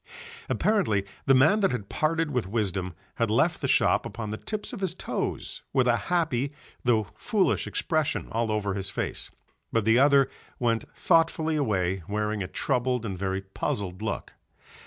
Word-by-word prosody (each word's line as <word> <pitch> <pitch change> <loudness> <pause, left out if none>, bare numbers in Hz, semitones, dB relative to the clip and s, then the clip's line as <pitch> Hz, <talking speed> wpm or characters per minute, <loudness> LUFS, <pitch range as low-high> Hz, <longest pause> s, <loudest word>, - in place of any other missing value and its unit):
Apparently 175 - +2 0.2
the 135 - +7
man 155 +11 +5
that 195 -2 +3
had 105 -6 -3
parted 160 +3 0
with 125 -7 -1
wisdom 95 -4 -2 0.2
had 115 -2 +1
left 110 - +2
the - - 0
shop - - +3
upon 110 -2 -5
the 110 - -3
tips 215 - -4
of - - -5
his 185 -3 -2
toes - - -3
with 130 -2 +3
a 120 - +5
happy 150 -6 +1 0.3
though 115 -3 +3
foolish 190 - +1
expression 155 -3 0
all 115 -1 0
over 105 -2 0
his 95 0 -2
face, - - -4 0.4
but 115 -2 +1
the 115 +2 +5
other 140 -1 +6 0.3
went 115 -2 +1
thoughtfully 160 -1 +2
away 95 -9 0
wearing 105 0 -1
a 90 - -2
troubled 125 +2 0
and 95 -4 -4
very 95 0 -1
puzzled 95 0 -3
look. 110 -1 -3
115 Hz, 165 wpm, -27 LUFS, 100-150 Hz, 0.4 s, the